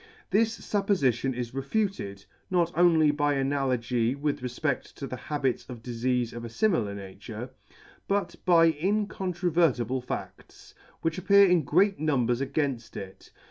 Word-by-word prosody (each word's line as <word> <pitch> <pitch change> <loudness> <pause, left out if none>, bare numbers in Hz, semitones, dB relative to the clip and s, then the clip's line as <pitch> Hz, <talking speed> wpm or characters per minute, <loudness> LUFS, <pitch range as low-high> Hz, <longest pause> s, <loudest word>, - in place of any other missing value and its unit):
This 225 +2 +2
fuppofition 135 - 0
is 120 -1 -4
refuted, 135 - -2 0.2
not 175 -2 +1
only 165 -3 +5
by 145 -1 +1
analogy 130 -3 0
with 145 -1 -2
refpedt 125 +3 -3
to 140 - -6
the 130 - -5
habits 135 +1 -2
of 120 -3 -8
difeafes 120 0 -1
of 120 0 -7
a - - -4
frmilar 115 - 0
nature, 105 +5 -8 0.6
but 200 0 0
by 170 -2 +6
in 195 +7 0
controvertible 170 - 0
fa£ts, 125 - -8 0.3
which 165 +2 0
appear 200 +2 +6
in 180 -4 +3
great 195 +8 +2
numbers 130 -5 +1
againft 135 -4 -2
it. 95 -1 -9
140 Hz, 140 wpm, -27 LUFS, 120-175 Hz, 0.6 s, by